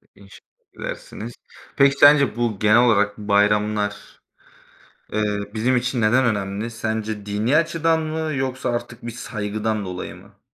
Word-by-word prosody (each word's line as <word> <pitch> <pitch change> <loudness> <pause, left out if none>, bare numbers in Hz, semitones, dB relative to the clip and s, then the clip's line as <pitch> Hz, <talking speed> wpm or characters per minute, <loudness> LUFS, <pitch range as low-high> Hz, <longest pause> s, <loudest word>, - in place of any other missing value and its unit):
İnşallah 100 -2 -19
gidersiniz. 115 +3 -7 0.4
Peki, 140 0 +4
sence 145 -2 +6
bu, 115 -4 -1
genel 110 +2 +5
olarak 105 -2 +2
bayramlar, 105 0 0 0.9
eee, 105 -1 0
bizim 125 +3 +1
için 125 0 -1
neden 125 +5 +3
önemli? 105 0 -2
Sence 110 -2 -4
dini 105 +8 +1
açıdan 165 0 +1
mı 155 0 -3
yoksa 130 -2 -2
artık 120 -1 -5
bir 120 - -4
saygıdan 110 -2 -3
dolayı 90 -1 -6
mı? - - -18
110 Hz, 130 wpm, -22 LUFS, 105-130 Hz, 0.9 s, sence